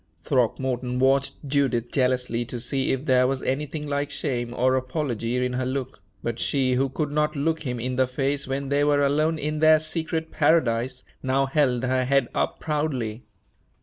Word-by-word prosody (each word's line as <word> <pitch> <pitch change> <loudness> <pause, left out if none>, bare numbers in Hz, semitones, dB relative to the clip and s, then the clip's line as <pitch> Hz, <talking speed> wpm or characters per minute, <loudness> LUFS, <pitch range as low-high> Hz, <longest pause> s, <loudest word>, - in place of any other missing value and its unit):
Throckmorton 125 0 0
watched 135 +1 +2
Judith 130 -4 +1
jealously 125 -3 +1
to 120 +1 -5
see 130 +3 -1
if 135 +2 -2
there 125 -2 +4
was 135 0 -2
anything 150 +3 -2
like 145 0 -1
shame 120 -5 -2
or 130 +2 +2
apology 125 -3 -1
in 125 - -2
her 130 +1 -1
look; 130 0 -4 0.2
but 115 0 -3
she, 130 -2 +1
who 135 +2 +1
could 145 +2 -2
not 150 +1 0
look 160 +3 0
him 125 -1 -3
in 125 +2 -3
the 130 -1 +3
face 140 +2 -1
when 135 +1 -3
they 140 +1 +2
were 145 -1 +3
alone 155 +3 +1
in 150 +1 -2
their 155 0 +7
secret 160 +1 -3
paradise, 130 -5 +1 0.2
now 135 +1 +1
held 135 -3 +1
her 130 0 +1
head 135 -2 +2
up - - -1
proudly. 130 -8 -2
135 Hz, 180 wpm, -25 LUFS, 125-145 Hz, 0.2 s, their